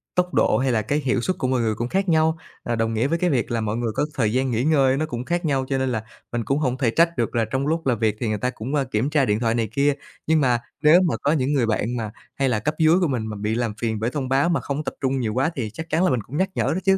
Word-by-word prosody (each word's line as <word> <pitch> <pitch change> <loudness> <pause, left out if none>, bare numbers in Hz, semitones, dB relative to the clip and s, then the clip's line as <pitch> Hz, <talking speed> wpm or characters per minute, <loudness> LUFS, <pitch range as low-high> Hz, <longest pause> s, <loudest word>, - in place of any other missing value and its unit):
tốc 180 0 +1
độ - - +3
hay 130 0 +1
là 110 -3 +2
cái 145 +8 -1
hiệu 130 -3 0
suất 185 +8 -1
của 130 - -1
mọi 125 -2 +1
người 110 -1 0
cũng 120 +3 -2
khác 195 +3 0
nhau, 160 0 +3 0.3
à, 120 - -1
đồng 115 0 0
nghĩa 115 +4 +1
với 165 +3 0
cái 180 0 +2
việc 125 -6 0
là 115 -1 0
mọi 110 +1 -2
người 120 -2 -1
có - - +1
thời 110 -4 0
gian 130 0 +1
nghỉ 115 +1 0
ngơi 135 -3 +3
nó 155 - 0
cũng 125 -5 -5
khác 175 +2 -1
nhau 135 -3 +1
cho 135 - +1
nên 130 0 0
là 110 -3 -2 0.3
mình 120 -1 -2
cũng 135 +7 0
hổng 130 -4 0
thể 125 -4 +1
trách 170 +2 +2
được 120 0 -1
là 115 - +2
trong 130 +6 -2
lúc 165 0 -1
làm 120 -4 +1
việc 110 -2 +1
thì 120 - -1
người 105 - 0
ta 125 +4 -1
cũng, 130 +4 -4
a, 140 - +2
kiểm 120 +2 -1
tra 150 -3 +2
điện 105 -2 +1
thoại 115 -1 +1
này 115 -3 -1
kia. 140 +4 +2 0.3
Nhưng 160 -1 +3
mà 125 -3 +2 0.2
nếu 160 +4 +7
mà 175 -5 +1
có 145 - +2
những 140 -2 +1
người 135 -5 +2
bạn 115 +2 -1
mà 110 -3 -4 0.2
hay 135 -1 +1
là 110 - +1
cấp 150 +9 -2
dưới 160 +3 +5
của 175 - +3
mình 120 -6 -2
mà 110 - -5
bị 105 +2 -1
làm 120 -3 -1
phiền 110 -2 -1
bởi 115 - 0
thông 135 -3 -3
báo 140 +5 +3
mà 170 - +1
không 140 +2 -3
tập - - -4
trung 135 0 0
nhiều 110 -4 -1
quá 135 +7 +1
thì 115 -5 -3
chắc 160 +5 -7
chắn 165 +2 +2
là 185 - +4
mình 125 - 0
cũng 135 +8 -7
nhắc 190 +1 +1
nhở - - +1
đó 180 - 0
chứ, 195 -1 +4
130 Hz, 330 wpm, -23 LUFS, 115-150 Hz, 0.3 s, nếu